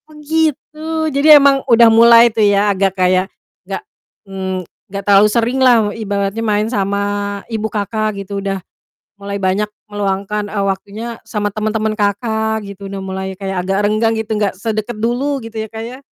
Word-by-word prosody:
Oh 305 - -15
gitu, 310 0 -1 0.3
jadi 295 +2 +7
emang 275 -1 +4
udah 235 -1 +7
mulai 235 0 +7
tuh 220 - 0
ya 205 0 +3
agak 195 0 0
kayak, 185 0 +2 0.4
enggak - - -5 0.4
mmm, 190 -1 -4 0.2
enggak 200 +1 -5
terlalu 205 +1 +6
sering 235 +4 0
lah 255 -2 +6 0.2
ibaratnya 200 -1 -2
main 210 -1 +1
sama 200 -1 0 0.4
ibu 220 -2 -3
Kakak 215 0 -2
gitu. 200 0 -5
Udah, 195 0 -2 0.6
mulai 200 0 -5
banyak 195 +2 0 0.2
meluangkan, 205 +1 -2
eee, 200 -2 -1
waktunya 200 +3 -4 0.2
sama 205 -2 -2
teman-teman 215 0 -1
Kakak 220 +1 -1
gitu. 200 0 -9
Udah 195 0 -5
mulai 190 0 -5
kayak 195 -2 -3
agak 195 +1 0
renggang 215 +2 +1
gitu, 220 0 -2
nggak 205 -2 0
sedekat 215 +2 -3
dulu, 250 +6 -1
gitu 225 0 -10
ya, 220 - -7
Kak, 220 0 -7
ya. 250 +2 -9
210 Hz, 165 wpm, -16 LUFS, 200-230 Hz, 0.6 s, jadi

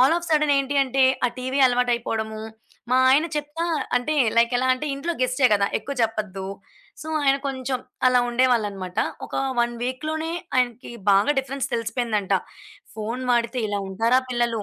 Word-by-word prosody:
All 270 +6 +5
of 345 0 -8
sudden 300 -2 +3
ఏంటి 275 +1 -1
అంటే, 265 +1 +1 0.2
ఆ - - +1
టీవీ 260 +2 -2
అలవాటయిపోవడము. 235 -3 -1 0.5
మా 255 - +4
ఆయన 300 +5 +4
చెప్తా, 295 +3 -4 0.3
అంటే 300 +5 0 0.2
లైక్ 235 +1 +4
ఎలా 255 +1 0
అంటే 255 +4 -3
ఇంట్లో 335 +5 -3
గెస్ట్‌టే 255 +1 +3
కదా 200 -1 +3
ఎక్కువ 280 - -6
చెప్పద్దు. 210 -4 -2 0.6
సో, 310 - -9 0.2
ఆయన 275 0 +4
కొంచెం 260 -1 -2 0.3
అలా 250 0 +5
ఉండేవాళ్ళున్నమాట. 215 -6 0 0.3
ఒక - - -20 0.3
1 240 0 +1
వీక్‌లోనే 310 +6 -3 0.2
ఆయనకి 245 -1 0 0.2
బాగా 200 +9 +4
డిఫరెన్స్ 270 0 -2
తెలిసిపోయిందంట. 225 -4 -1 0.6
ఫోను 230 +4 -4
వాడితే 235 +1 0
ఇలా 205 0 -1
ఉంటారా 230 +6 +2
పిల్లలు. 235 -3 0
250 Hz, 150 wpm, -23 LUFS, 225-270 Hz, 0.6 s, All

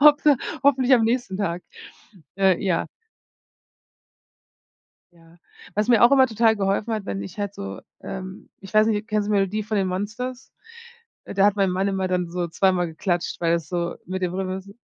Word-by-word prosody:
Hoffe 295 0 +6 0.3
hoffentlich 265 -2 +3
am 235 - +3
nächsten 230 -5 -1
Tag. 175 -3 -2 0.7
Äh, 190 -2 +3
ja. 180 -4 0 2.3
Ja, 165 0 -21 0.4
was 210 +2 +1
mir 235 -1 +5
auch 240 - +7
immer 265 -2 +6
total 225 0 +3
geholfen 205 +3 -1
hat, 215 -2 -3
wenn 100 0 -4
ich 100 - -9
halt 200 -1 -3
so, 95 - -7 0.2
ähm 190 0 -8
ich 195 +2 -12
weiß 215 +1 +5
nicht, 215 0 -1
kennst 210 -1 0
du - - -1
die 205 - +3
Melodie 200 +2 0
von 215 0 -2
den 190 -1 +1
Monsters? 230 +7 -5 0.7
Äh, - - -7
da 195 0 +4
hat 205 - +3
mein 195 -2 +2
Mann 190 +2 0
immer 190 -1 -1
dann 180 -2 -1
so 175 0 -2
zweimal 180 +1 +1
geklatscht, 175 +2 -2
weil 170 -1 +2
das 170 -2 -1
so 175 -1 -2
mit 185 +1 -4
dem 180 -1 -1
Rhythmus 190 +1 -4
195 Hz, 185 wpm, -23 LUFS, 180-220 Hz, 2.3 s, auch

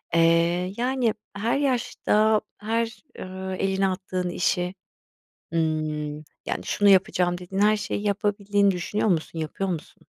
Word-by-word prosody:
Eee, 170 +2 +3
yani, 245 -2 +1 0.2
her 225 +6 0
yaşta, 220 -5 +2 0.2
her, 225 +3 -2 0.2
ııı, 190 0 -5
elini 195 0 +1
attığın 185 -1 -2
işi, 180 +1 0 0.8
ımm, 155 -2 -1 0.3
yani, - - -3
şunu 205 0 +3
yapacağım 180 -2 +3
dediğin 180 +2 -3
her 215 +1 +5
şeyi 210 - -3
yapabildiğini 205 0 +2
düşünüyor 190 +4 -1
musun, 165 -1 -1
yapıyor 160 +5 -2
musun? 170 -4 -6
190 Hz, 125 wpm, -25 LUFS, 175-210 Hz, 0.8 s, her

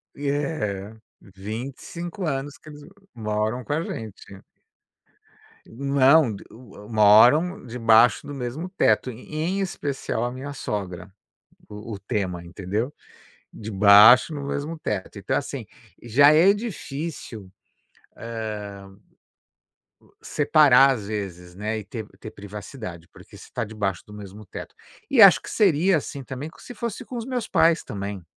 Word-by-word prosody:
E 140 0 -3
é, 110 -9 -3 0.3
25 130 - -7
anos 140 -1 -3
que 155 - -15
eles 150 -1 -12 0.3
moram 110 +2 -2
com 145 - -3
a 160 - 0
gente. 105 - -8 1.2
Não, 140 +3 +3
o - - -5
d - - -11 0.5
moram 120 - +5
debaixo 115 0 +4
do 145 - -7
mesmo 135 +6 -5
teto, 120 -6 +1
em 155 - -4
especial 140 -10 -3
a 120 - -2
minha 135 +3 -7
sogra, 95 -6 -5 0.6
o 105 +2 -9
o - - -7
tema, 95 -4 -3
entendeu? 100 +9 -4 0.6
Debaixo, 105 - +6
no 145 -2 -5
mesmo 150 +3 -4
teto, 95 - -4
então - - -2
assim, - - -4 0.3
já 140 +6 +5
é 170 +6 +6
difícil, 155 - -6 2.5
u - - -26
hã, - - -26
separar 140 -3 +5
às 105 -6 -5
vezes, 90 -4 -6
né, 105 +2 -3
e 105 - -7
ter 110 0 -7
ter 110 - -8
privacidade, 100 -3 -9
porque - - -15
você - - -13
tá - - -2
debaixo 105 -4 -3
do 105 - -12
mesmo 105 0 -11
teto. - - -9 0.4
E 270 -5 +4
acho 195 -3 +8
que - - -9
seria, 185 -3 +3
assim, 140 -1 -7
também 130 +4 -7
se - - -10
fosse 235 +1 -5
com 250 - -8
os 235 0 -5
meus 250 -3 -3
pais 165 0 +3
também. 100 -1 -6
120 Hz, 140 wpm, -24 LUFS, 105-150 Hz, 2.5 s, acho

